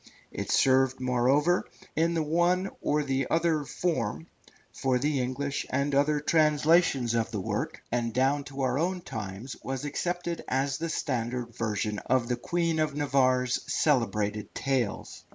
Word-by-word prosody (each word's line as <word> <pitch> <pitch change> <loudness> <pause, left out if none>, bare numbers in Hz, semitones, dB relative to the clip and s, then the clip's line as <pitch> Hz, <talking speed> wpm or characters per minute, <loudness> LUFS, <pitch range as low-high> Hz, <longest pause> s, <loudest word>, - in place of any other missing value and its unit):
It - - -5
served, 130 0 +3
moreover, 130 +7 +2 0.3
in 165 +2 +2
the 160 - +1
one 175 +5 +1
or 150 0 +1
the 135 -2 -1
other 165 -2 +2
form, 115 - -2 0.5
for 130 -1 +1
the 140 +1 0
English 140 +3 -2
and 140 +2 0
other 145 +2 +3
translations 150 -4 +3
of 115 -1 0
the 110 -3 -3
work, 95 - -3
and 120 -1 0
down 135 +4 +1
to 140 -1 -6
our 130 +1 +1
own 180 +2 -1
times 110 - -6
was 135 +1 -4
accepted 175 +3 -3
as 135 +1 0
the 165 +1 -2
standard 120 -4 -2
version 105 -1 -2
of 125 -1 0
the 125 - +1
Queen 165 +5 -1
of 155 -2 0
Navarre's 130 -4 +2
celebrated 105 -7 0
tales. 130 -6 -2
135 Hz, 150 wpm, -28 LUFS, 125-155 Hz, 0.5 s, served